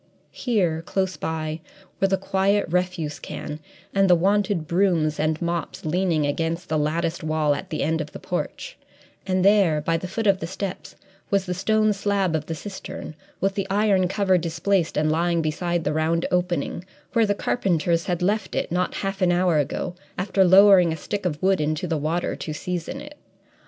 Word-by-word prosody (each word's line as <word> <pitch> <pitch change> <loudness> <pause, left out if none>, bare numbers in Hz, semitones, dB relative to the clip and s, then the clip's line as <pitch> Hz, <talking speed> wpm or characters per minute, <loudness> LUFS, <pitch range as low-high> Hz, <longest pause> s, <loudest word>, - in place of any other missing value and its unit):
Here, 185 -10 0
close 190 +1 -1
by, 155 +1 -3 0.4
were 195 - +3
the 195 0 +1
quiet 195 +2 +1
refuse 175 -3 -1
can 150 0 -6 0.3
and 195 -1 +3
the 180 - +7
wonted 195 -1 +1
brooms 170 -4 +1
and 155 0 0
mops 170 -2 -3
leaning 165 -2 +1
against 165 +4 -2
the 155 -1 +1
latticed 165 +3 -1
wall 155 -1 +1
at 185 +6 -6
the 155 - -2
end 160 0 0
of 150 - -7
the - - -8
porch, - - -5 0.5
and 185 0 +1
there, 195 -7 +4
by 165 +2 0
the 180 - -5
foot 220 +5 -3
of 195 -2 +4
the 165 - -4
steps, 190 +1 -6 0.3
was 200 -1 +1
the 180 - -2
stone 215 +3 +2
slab 195 -3 0
of 155 -1 -3
the 165 - -3
cistern, 190 -2 -7 0.3
with 195 +1 +1
the 195 -1 -2
iron 195 -2 +3
cover 190 -1 +2
displaced 170 +2 0
and 155 0 +2
lying 170 +1 +1
beside 170 +2 -1
the - - 0
round 160 +2 +1
opening, 180 -2 -1 0.3
where 230 -2 +3
the 205 - +1
carpenters 170 -7 0
had 180 0 -1
left 205 +1 0
it, - - -1
not 180 +1 0
half 195 0 -3
an 180 -1 +4
hour 175 -3 +3
ago, 150 +5 -2 0.2
after 190 +1 +2
lowering 190 -1 +7
a 160 - -3
stick 200 +4 -3
of 150 -3 -3
wood 190 -3 +3
into 155 +3 -1
the 165 -2 -1
water, 160 +4 -1
"to 155 - -5
season 175 +1 -4
it." 295 0 -12
175 Hz, 190 wpm, -24 LUFS, 160-195 Hz, 0.5 s, the